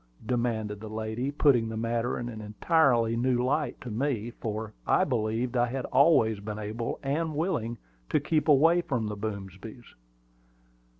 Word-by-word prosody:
demanded 110 -3 -1
the 110 +1 -8
lady, 110 +4 -3
putting 135 -6 +3
the 110 - -5
matter 115 +1 -1
in 120 - -4
an 110 -3 -7
entirely 115 +1 +2
new 125 +1 +1
light 145 +4 0
to 125 - -7
me, 120 -1 -1
for 110 -1 -5
I - - +4
believed 120 0 -1
I 120 0 +3
had 130 +2 -3
always 130 -6 +4
been 105 +1 -6
able 110 +2 -4
and 155 +3 -1
willing 125 -8 -1 0.3
to - - +3
keep 155 -2 0
away 160 +4 +5
from 125 -9 -2
the 105 0 -3
Boomsbys. 100 +2 -7
120 Hz, 160 wpm, -28 LUFS, 110-135 Hz, 0.3 s, away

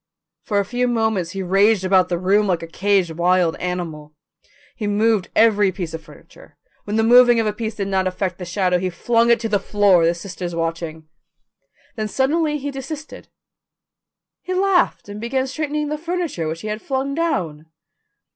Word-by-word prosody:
For 205 -2 -1
a 200 - 0
few 245 +4 -1
moments 220 -7 0
he 195 -1 -4
raged 195 +2 +3
about 185 -1 +3
the 175 - 0
room 200 +4 +2
like 175 -3 0
a - - -6
caged 190 0 +1
wild 175 0 +2
animal. 165 -4 -5 0.6
He 210 - -4
moved 210 -1 +1
every 210 -3 +4
piece 175 -4 -6
of 160 - -5
furniture; - - -17 0.3
when 210 - -3
the 225 - +2
moving 240 0 +6
of 225 - +1
a 210 - 0
piece 220 0 -4
did 200 -2 -3
not 190 -1 0
affect 185 0 -3
the 180 - -6
shadow, 180 0 0
he 185 +1 -1
flung 230 +6 +1
it 235 - +4
to 225 - -1
the 205 -2 +1
floor, 195 -3 +3
the 170 +1 +2
sisters 175 -1 -6
watching. 165 -1 -4 0.9
Then 215 -1 -2
suddenly 300 - 0
he 285 0 -5
desisted. 295 +3 -8 1.1
He 370 - -4
laughed 380 - +1
and 205 +1 -8
began 260 +3 -1
straightening 300 +2 -3
the 300 0 -3
furniture 335 - -3
which 160 +1 -4
he 215 - -6
had 215 +1 -4
flung 270 0 -2
down. 180 - -2
205 Hz, 185 wpm, -20 LUFS, 180-245 Hz, 1.1 s, moving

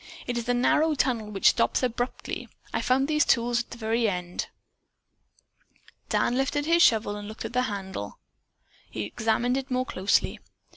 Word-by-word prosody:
It 245 - -3
is 240 0 -3
a 245 - +3
narrow 305 +5 +3
tunnel 235 -6 0
which 200 -2 +4
stops - - +1
abruptly. 245 0 -3 0.2
I - - 0
found 265 +2 +2
these 300 -1 +3
tools 235 +1 +2
at 240 - -5
the - - -9
very 225 0 +1
end." 180 -2 -4 1.6
Dan 240 - +1
lifted 270 +2 0
his 335 +2 +4
shovel 220 -5 +4
and 205 0 -7
looked 215 - -7
at - - -6
the 250 - +2
handle. 190 - -6 0.7
Then - - -28
he 110 - -3
examined 225 - 0
it 270 0 -4
more 255 0 0
closely. 190 -3 +1
240 Hz, 175 wpm, -26 LUFS, 210-255 Hz, 1.6 s, which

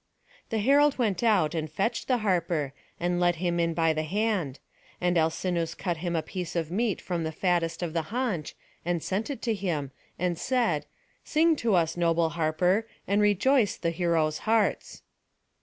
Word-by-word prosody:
The 225 - -1
herald 280 +6 +4
went 210 -8 0
out, 200 -10 +3
and 155 -2 -3
fetched 210 +8 -1
the 255 - +3
harper, 170 -7 0 0.3
and 175 +1 0
led 175 -1 +3
him 175 0 -1
in 165 -1 +1
by 165 -1 +3
the 155 - -1
hand; 185 - -1 0.4
and 180 0 +1
Alcinous 165 +1 0
cut 175 -3 -2
him 175 +1 -2
a 160 - 0
piece 180 -3 -5
of 165 -2 -1
meat 215 +2 0
from 175 -2 -3
the 160 - -2
fattest 175 0 0
of 165 -2 -3
the 165 - +1
haunch, 225 - -2 0.3
and 175 -1 -1
sent 200 +7 -2
it 280 - -5
to 230 - +1
him, 170 -9 -2 0.3
and 175 -1 -1
said: 250 -2 0 0.4
"Sing 320 +1 +3
to 225 -6 +1
us, 165 -1 +1
noble 165 -1 +2
harper, 170 +6 +1 0.2
and 200 +2 +2
rejoice 210 +3 +3
the 170 - -1
heroes' 165 -3 +1
hearts." 220 -1 0
175 Hz, 175 wpm, -27 LUFS, 165-210 Hz, 0.4 s, herald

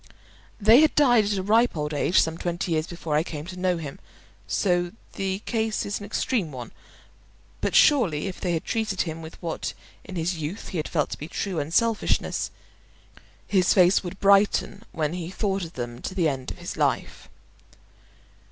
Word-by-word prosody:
They 225 +6 +7
had 310 - +3
died 245 -7 +5
at 205 0 0
a 190 - -2
ripe 225 0 +3
old 150 0 -2
age 150 +5 +3
some 160 0 -1
twenty 175 +2 -3
years 155 -1 0
before 170 -3 -3
I 150 - +4
came 155 -2 -6
to 185 0 -8
know 180 -1 +1
him, 150 -4 -7 0.5
so 175 -2 +1 0.2
the 195 +1 -3
case 220 -2 -1
is 200 - -3
an 205 - -8
extreme 210 - -1
one; 125 -3 -8 0.9
but - - -1
surely 205 - +4
if 190 -2 -6
they 180 -2 0
had 165 - -2
treated 220 -4 -1
him 160 -1 -4
with 160 0 -10
what 165 -1 -3 0.3
in 190 - -9
his 170 +1 -1
youth 160 +7 -5
he 185 - -4
had 155 - -2
felt 150 -4 0
to - - -5
be 150 - -6
true 185 0 -3
unselfishness, 210 +10 0 1.0
his 185 -3 +3
face 185 0 +5
would 180 +1 -7
brighten 200 0 +3
when 155 -3 -1
he 175 -2 -4
thought 195 -1 -1
of 165 - -11
them 120 0 -6
to 185 - -5
the 175 -4 +2
end 130 -3 -3
of - - -7
his - - -6
life. - - -1
180 Hz, 190 wpm, -25 LUFS, 160-200 Hz, 1.0 s, They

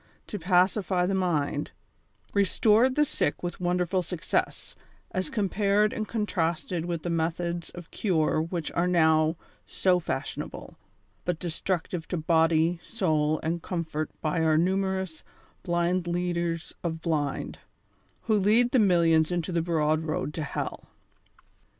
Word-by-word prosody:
to 210 - -6
pacify 180 +1 +2
the 195 - 0
mind, 155 -6 0 0.6
restored 215 +5 +3
the 300 - +4
sick 145 - -1
with 175 0 -4
wonderful 180 +1 +1
success, 175 -1 -2 0.4
as 185 0 -2
compared 210 +1 +1
and 215 -4 -3
contrasted 175 -5 -1
with 170 -2 -3
the 175 - -2
methods 170 +1 -1
of 175 -2 -10
cure 160 -6 +1
which 165 0 -3
are 175 +1 +1
now 160 -2 +3 0.3
so 180 -1 +2
fashionable, 145 -4 -5 0.5
but 180 -2 -1
destructive 175 0 -3
to 180 - -2
body, 165 +1 +2
soul 155 -8 0
and 165 +1 -1
comfort 160 -4 -3
by 155 +1 0
our 160 -1 +3
numerous 190 -1 0 0.4
blind 175 0 0
leaders 170 -1 -2
of 165 -2 -2
blind, 150 -4 -2 0.6
who 220 - +1
lead 225 +5 +3
the 260 - +4
millions 170 -5 +4
into 175 +1 -1
the 170 -1 +1
broad 155 -2 +1
road 155 -2 -2
to 160 - -4
hell. 140 - -5
175 Hz, 130 wpm, -27 LUFS, 160-185 Hz, 0.6 s, the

